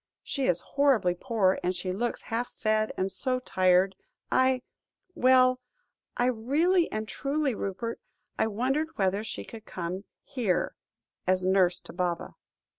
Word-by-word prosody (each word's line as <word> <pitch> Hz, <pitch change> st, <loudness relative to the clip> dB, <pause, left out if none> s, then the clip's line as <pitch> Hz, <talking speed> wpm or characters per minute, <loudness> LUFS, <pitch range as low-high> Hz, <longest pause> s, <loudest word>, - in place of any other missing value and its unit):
She 275 Hz, -2 st, -1 dB
is 175 Hz, -1 st, +2 dB
horribly 270 Hz, -11 st, +2 dB
poor, 195 Hz, -1 st, +1 dB
and 180 Hz, +1 st, 0 dB
she 180 Hz, +1 st, -3 dB
looks 235 Hz, +6 st, -2 dB
half 235 Hz, +2 st, -2 dB
fed, 215 Hz, 0 st, 0 dB
and 190 Hz, +1 st, 0 dB
so 255 Hz, +6 st, -1 dB
tired. 185 Hz, -4 st, +3 dB, 0.4 s
I 260 Hz, -1 st, +3 dB, 0.5 s
well 255 Hz, -3 st, +5 dB, 0.6 s
I 245 Hz, -, +3 dB
really 295 Hz, +10 st, +2 dB
and 215 Hz, 0 st, -3 dB
truly, 280 Hz, +1 st, -1 dB
Rupert, 205 Hz, +3 st, -4 dB, 0.4 s
I -, -, +1 dB
wondered 265 Hz, +9 st, -1 dB
whether 195 Hz, +1 st, +1 dB
she 220 Hz, -, -5 dB
could 225 Hz, -2 st, -10 dB
come 185 Hz, +3 st, -5 dB, 0.2 s
here 220 Hz, -9 st, -1 dB, 0.5 s
as 185 Hz, 0 st, +2 dB
nurse 185 Hz, -1 st, +3 dB
to -, -, -12 dB
Baba." 175 Hz, -1 st, -2 dB
220 Hz, 140 wpm, -28 LUFS, 185-255 Hz, 0.6 s, well